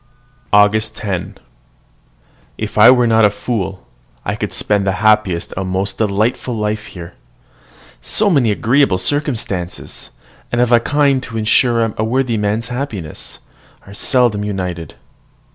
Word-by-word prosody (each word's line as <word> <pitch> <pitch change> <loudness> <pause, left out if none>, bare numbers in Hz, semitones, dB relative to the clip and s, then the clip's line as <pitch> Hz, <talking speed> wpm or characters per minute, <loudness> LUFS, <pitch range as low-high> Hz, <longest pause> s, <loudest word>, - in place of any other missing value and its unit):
AUGUST 105 +2 +3
10. 95 -5 -4 1.2
If - - -5
I - - +8
were 125 -1 +5
not 115 -1 +3
a 105 - +6
fool, 100 -3 -4 0.4
I - - -1
could - - -4
spend 100 -2 0
the 95 - +2
happiest 105 -5 +2
and 95 0 -3
most 95 +2 -2
delightful 110 +4 0
life 105 0 -2
here. 85 -2 -10 0.9
So 215 - +1
many 140 - +3
agreeable 115 0 +2
circumstances, 110 - -3 0.4
and 120 - 0
of 125 0 +2
a 120 - +6
kind 140 +1 +2
to 115 -3 -6
ensure 115 0 +2
a 110 - -1
worthy 125 +1 0
man's 105 +3 -1
happiness, 120 - -6 0.4
are 100 - -12
seldom 120 -2 +1
united. 90 -5 -4
110 Hz, 135 wpm, -17 LUFS, 100-120 Hz, 1.2 s, I